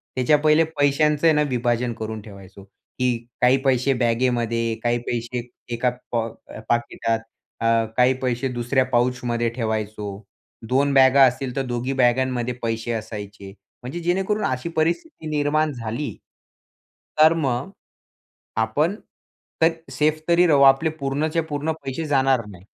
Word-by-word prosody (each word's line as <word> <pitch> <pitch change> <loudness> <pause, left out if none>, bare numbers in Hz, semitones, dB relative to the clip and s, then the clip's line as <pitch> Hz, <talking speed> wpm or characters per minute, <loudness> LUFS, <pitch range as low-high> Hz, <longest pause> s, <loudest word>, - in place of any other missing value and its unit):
त्याच्या 130 +4 +3
पहिले 155 +2 +4 0.2
पैशांच 150 +1 +2
आहे 165 -1 +6
ना 150 - +2
विभाजन 120 -1 0
करून 110 0 -5
ठेवायचो. 100 -2 -13
की 125 +5 -3 0.2
काही 125 +2 +5
पैसे 135 0 +2
बॅगेमध्ये 115 -1 0
काही 120 0 +2
पैसे 120 +1 -2 0.3
एका 120 +2 +1 0.2
पॉक 115 -1 -2 0.3
पाकिटात, 120 -1 0 0.4
अ, - - -1 0.3
काही 125 +1 +5
पैसे 125 0 -1
दुसऱ्या 120 +2 +1
पाऊचमध्ये 120 -1 0
ठेवायचो. 110 -3 -3 0.5
दोन 140 +2 +2
बॅगा 135 0 +6
असतील 125 0 -1
तर 135 - 0
दोघी 125 +2 -2
बॅगांमध्ये 125 -1 +1
पैसे 115 0 -2
असायचे. 105 -3 -6 0.3
म्हणजे 130 +8 -5
जेणेकरून 190 +5 0
अशी 130 +6 -2
परिस्थिती 165 - -1
निर्माण 150 +1 +1
झाली. 120 +3 -4 1.0
तर 155 +1 +7
मग. 135 -3 -1 0.9
आपण 145 - +1 0.7
तर 160 - +6 0.2
सेफ 155 +1 +1
तरी 170 +1 +5
राहू. 145 -4 +4
आपले 135 +4 +5
पूर्णच्या 150 +4 -1
पूर्ण 150 0 -2
पैसे 135 +4 -4
जाणार 135 -4 +2
नाही. 95 -3 -13
125 Hz, 130 wpm, -22 LUFS, 115-145 Hz, 1.0 s, तर